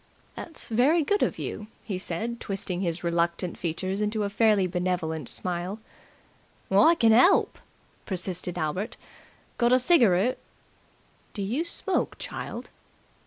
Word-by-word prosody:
"That's 325 - -4
very 275 +9 +3
good 410 +7 +1
of - - +1
you," 210 - -5 0.2
he 195 -5 -4
said, 225 +7 -3
twisting 195 -2 -4
his 170 -2 -2
reluctant 170 +1 0
features 185 +4 -3
into 210 0 0
a 200 - -2
fairly 215 -2 +3
benevolent 175 -3 -2
smile. 180 +2 -3 0.9
"I 210 - +6
can 230 -7 +4
'elp!" 255 - +4 0.5
persisted 180 -2 -2
Albert. 175 +6 -3 0.6
"Got 240 0 +3
a - - +7
cigaroot?" 245 - +3 1.0
"Do 200 - -3
you 240 +11 -1
smoke, 360 +2 -1
child?" - - -6
200 Hz, 125 wpm, -26 LUFS, 180-235 Hz, 1.0 s, a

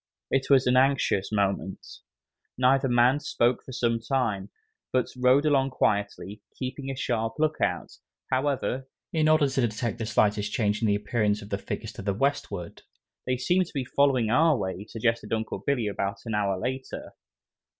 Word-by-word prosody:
It 135 0 +1
was 135 -2 +5
an 125 - +3
anxious 130 -7 +2
moment. 100 -2 -1 0.7
Neither 130 +2 +3
man 120 +3 +4
spoke 120 -3 0
for - - -10
some 115 -2 0
time, 115 -5 -1 0.4
but 130 -1 +2
rode 130 +3 +4
along 135 -3 +3
quietly, 100 -4 -1 0.2
keeping 135 +1 -5
a 135 - -3
sharp 115 -4 -1
look 155 0 0
out, - - -1 0.4
however, 135 -1 -1 0.2
in 155 -1 +3
order 155 -2 +4
to 135 0 0
detect 115 +1 -3
the 110 - -3
slightest 105 -1 +1
change 105 -1 0
in 115 - +2
the 100 - +3
appearance 105 -1 0
of 100 - -12
the 100 - -1
figures - - -5
to - - -8
the 100 0 -1
westward. 105 -8 -2 0.5
"They 125 0 +1
seem 180 +9 +2
to 175 - -11
be 135 -2 -1
following 130 -4 +2
our 155 +2 +4
way," 95 -1 -4
suggested 115 -1 -1
Uncle 110 0 -2
Billy 135 -5 +1
about 100 -1 -2
an 115 - -3
hour 100 -2 0
later. 130 +7 -5
120 Hz, 170 wpm, -27 LUFS, 105-135 Hz, 0.7 s, was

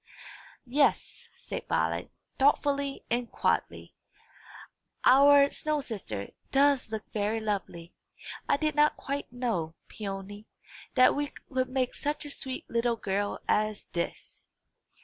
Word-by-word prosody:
"Yes," 280 +4 +1
said - - -7
Violet, - - 0 0.3
thoughtfully 280 0 +2
and 240 0 0
quietly; - - -1 1.1
"our 280 +1 +7
snow 305 -1 -1
sister 205 - -5 0.2
does 275 -4 +3
look 220 -1 -3
very 215 +1 0
lovely. 195 -5 -4 0.6
I - - +4
did 305 +1 0
not 295 +1 +3
quite 280 +1 -4
know, 225 -10 -2
Peony, 205 0 -7 0.5
that 255 -1 +6
we 290 0 0 0.3
could 255 0 +1
make 255 -1 0
such 295 +1 -3
a 290 - -6
sweet 260 -2 -6
little 235 0 +1
girl 205 -1 -2
as 215 -1 +1
this." 170 -1 -5
250 Hz, 120 wpm, -29 LUFS, 210-280 Hz, 1.1 s, our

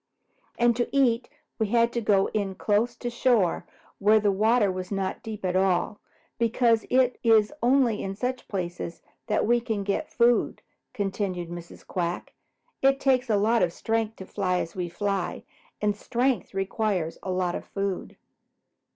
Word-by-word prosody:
"And 240 0 +3
to 240 - 0
eat 245 -3 +2 0.3
we 220 - +1
had 235 +2 +2
to 235 - -1
go 200 -3 +3
in 200 -3 -1
close 220 +5 +1
to 240 0 -4
shore 235 -7 +1 0.3
where 215 +2 +5
the 205 -1 +2
water 215 +1 +3
was 185 +1 -6
not 195 -1 -2
at 195 -4 -3
all 185 0 +2
deep, 205 - -25 0.4
because 230 -1 +2
it 255 -1 +2
is 225 0 +4
only 245 -3 +3
in 195 0 -4
such 250 +4 -3
places 175 -3 -5 0.2
that 210 - +1
we 240 +2 +3
can 220 -4 -2
get 200 +10 -2
food," 240 0 +2 0.3
continued 195 -4 -2
Mrs. 175 0 -9
Quack. 175 -2 -3 0.5
"It 270 0 +4
takes 260 -2 +2
a 210 - +3
lot 225 +3 +3
of 170 - +2
strength 225 +3 -1
to 190 - -9
fly 185 -3 -1
as 165 - -4
we 180 -2 -3
fly, 195 +1 -2 0.4
and 210 -1 +2
strength 240 -1 -1
requires 195 -4 -1
plenty 185 -2 -1
of - - -10
food. 195 -2 -4
210 Hz, 160 wpm, -26 LUFS, 190-235 Hz, 0.5 s, where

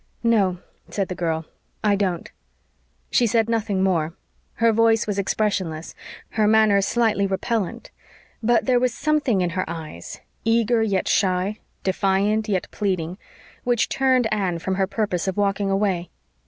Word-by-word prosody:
"No," 205 -6 +3 0.3
said 195 -2 -2
the - - -2
girl, 165 -2 -2 0.4
"I 205 -1 +3
don't." 185 -4 -2 0.8
She 240 - +3
said 225 0 +2
nothing 215 -4 0
more; 170 -3 0 0.4
her 230 -1 +3
voice 225 0 +3
was 205 -2 -2
expressionless; 190 -6 -1 0.4
her 215 -2 +1
manner 215 -2 +5
slightly 215 -1 +1
repellent; 220 +3 -2 0.5
but 235 +1 +2
there 250 -2 +3
was 250 -1 0
something 295 -10 +1
in 175 -1 0
her 185 +2 -1
eyes 155 - -7 0.2
eager 230 0 +2
yet 200 -4 0
shy, 190 +2 +1 0.2
defiant 200 +3 +1
yet 190 -3 0
pleading 185 -3 -2 0.4
which 240 -3 +1
turned 260 -2 +2
Anne 190 -5 0
from 185 +3 -2
her 190 0 +1
purpose 195 -4 -1
of 190 - -2
walking 200 0 +1
away. 195 -3 0
200 Hz, 145 wpm, -23 LUFS, 185-225 Hz, 0.8 s, manner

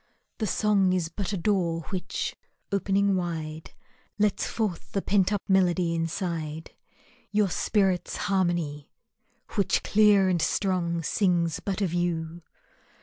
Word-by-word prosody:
The 215 - 0
song 200 -3 +2
is 175 -3 0
but 195 +3 -4
a 200 - -1
door 170 -3 0
which, 185 -1 -3 0.4
opening 200 0 +2
wide, 160 -3 -4 0.5
Lets 210 -2 +1
forth 210 -7 -3
the 195 - 0
pent 195 -1 +2
up 205 -2 -1
melody 180 -3 +3
inside, 165 -2 -3 0.6
Your 205 -3 +1
spirit's 190 -4 +1
harmony, 175 -7 -1 0.6
which 200 -4 +1
clear 205 -2 +5
and 180 -3 +1
strong 170 -2 0
Sings 170 -3 +1
but 200 0 -3
of 175 -3 -1
you. 170 -1 -2
185 Hz, 125 wpm, -27 LUFS, 170-200 Hz, 0.6 s, clear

